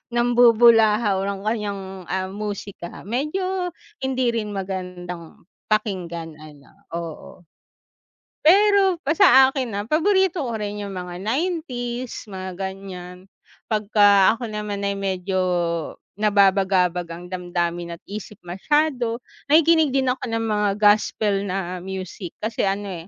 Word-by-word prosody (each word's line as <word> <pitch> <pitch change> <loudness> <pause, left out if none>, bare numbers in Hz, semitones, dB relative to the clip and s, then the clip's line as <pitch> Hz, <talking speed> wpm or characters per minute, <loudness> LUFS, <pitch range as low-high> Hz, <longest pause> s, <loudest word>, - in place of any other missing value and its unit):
nambubulahaw 230 -3 +5
ng 200 -1 -3
kaniyang, 210 -2 -2 0.3
ah, 190 0 -2
musika. 200 -3 -6
Medyo, 360 - -2 0.3
hindi 260 -2 0
rin 215 -3 -3
magandang 180 -3 -6 0.2
pakinggan 175 -7 -2
ano. 150 -3 -14 0.2
Oo. 170 +1 -8 1.0
Pero, 390 0 +5
pa 310 - +2
sa 265 -3 +7
akin 265 -3 -3
ah, 205 0 -3
paborito 365 - +2
ko 230 -4 -3
rin 205 0 -4
yung 200 - -6
mga 180 -2 -6
90's, 250 - -3
mga 190 -2 -6
ganyan. 190 -2 -7 0.5
Pagka 205 -1 +4
ako 230 -2 -6
naman 210 -1 -4
ay 200 0 -1
medyo 190 -1 -2 0.8
nababagabag 190 -4 +3
ang 170 +1 -8
damdamin 175 -1 -3
at 170 - -22
isip 210 +1 -8
masyado, 245 - 0 0.2
nakikinig 315 -1 +4
din 265 -2 +2
ako 250 0 -4
ng 225 0 -1
mga 210 -2 +1
gospel 210 -1 +2
na 185 -1 -3
music. 185 -1 -7
Kasi 220 -2 0
ano 195 -4 -3
205 Hz, 120 wpm, -22 LUFS, 185-245 Hz, 1.0 s, sa